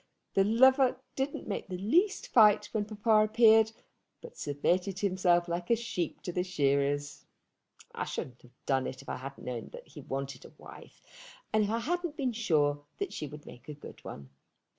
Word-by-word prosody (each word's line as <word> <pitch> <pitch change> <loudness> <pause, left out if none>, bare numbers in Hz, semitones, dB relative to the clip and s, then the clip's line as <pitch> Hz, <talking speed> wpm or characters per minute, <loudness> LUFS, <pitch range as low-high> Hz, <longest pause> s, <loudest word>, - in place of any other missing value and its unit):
The 195 - +4
lover 260 +5 +5 0.2
didn't 270 +1 -3
make 200 - -4
the 185 -1 -5
least 345 - +1
fight 215 -3 +5
when 215 -2 -1
papa 215 +1 +3
appeared, 220 0 +5 0.5
but 480 - -12
submitted 180 +6 -1
himself 180 -3 +2
like 175 +1 -3
a 235 - +5
sheep 215 -8 -4
to 180 - -3
the 180 +1 -1
shearers. 145 -4 0 0.7
I - - -3
shouldn't 125 -1 -6
have 125 0 -22
done 135 -1 +1
it 130 - -7
if - - -12
I - - -3
hadn't 135 +2 -9
known 120 -3 -5
that - - -11
he - - -10
wanted 135 -1 -5
a - - -14
wife - - -14 0.5
and 215 -1 +3
if - - -3
I 225 - 0
hadn't 345 +3 -2
been 260 -4 -1
sure 145 -9 +1
that 400 - -4
she 150 - -4
would 150 +1 -11
make 125 +4 -13
a 150 - -6
good 145 - -12
one. 70 -1 -9
185 Hz, 185 wpm, -30 LUFS, 145-225 Hz, 0.7 s, lover